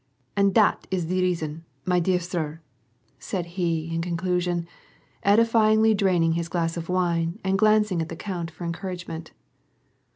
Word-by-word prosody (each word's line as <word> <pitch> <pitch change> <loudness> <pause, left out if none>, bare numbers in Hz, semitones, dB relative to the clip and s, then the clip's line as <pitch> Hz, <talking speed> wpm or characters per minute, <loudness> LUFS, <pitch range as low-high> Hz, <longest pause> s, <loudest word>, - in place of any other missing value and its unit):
And 200 0 +3
dat 215 -2 +3
is 180 -3 -1
de 185 +3 -1
reason, 165 -3 -1 0.2
my 180 -1 +3
dear 180 +1 +2
sir," 165 -3 -4 0.6
said 180 -3 -3
he, 170 -2 -2
in 165 - -1
con 170 0 -2
clusion, 180 -1 0 0.6
edifyingly 220 +1 +4
draining 180 -5 +2
his 170 0 -2
glass 165 -1 -1
of 170 0 -6
wine 175 0 0
and 190 0 +1
glancing 210 -3 +3
at 160 - -4
the 165 - -5
count 175 -2 -4
for 170 - -10
encouragement. 170 -2 -5
175 Hz, 155 wpm, -25 LUFS, 165-195 Hz, 0.6 s, edifyingly